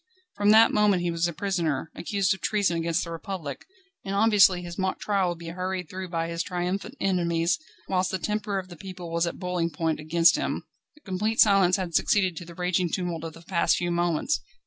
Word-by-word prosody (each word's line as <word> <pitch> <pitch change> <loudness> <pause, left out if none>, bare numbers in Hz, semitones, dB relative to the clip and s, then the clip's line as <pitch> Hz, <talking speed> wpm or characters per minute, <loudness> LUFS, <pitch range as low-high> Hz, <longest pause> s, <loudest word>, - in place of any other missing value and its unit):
From 205 0 +2
that 220 +2 +7
moment 205 -4 +3
he 175 - 0
was 170 +1 0
a - - -3
prisoner, 165 -4 -2
accused 195 +2 0
of 190 - -9
treason 200 -5 +1
against 165 +1 0
the 170 - -6
Republic, 165 -4 -6 0.4
and 195 0 -3
obviously 200 -4 +5
his 175 +1 -7
mock 190 0 -1
trial 195 -3 +1
would 175 - -4
be 165 0 -8
hurried 180 -1 -4
through 185 0 -5
by 165 -1 -2
his 170 0 -3
triumphant 180 +7 -3
enemies, 170 - +1 0.3
whilst 185 -1 +1
the 190 - -1
temper 210 +1 -2
of 185 -1 -5
the 175 - -9
people 180 0 -8
was 170 +1 +1
at - - -4
boiling 180 -2 -1
point 160 0 -2
against 165 +2 +4
him. - - -2 0.4
Complete 210 +3 -1
silence 195 -4 +6
had 180 -3 -3
succeeded 185 0 +2
to 175 - -7
the 170 0 -12
raging 180 0 0
tumult 175 -2 -3
of 165 -1 -6
the 165 - -14
past 170 -1 +2
few 175 0 -1
moments. 175 - 0
180 Hz, 210 wpm, -26 LUFS, 170-195 Hz, 0.4 s, that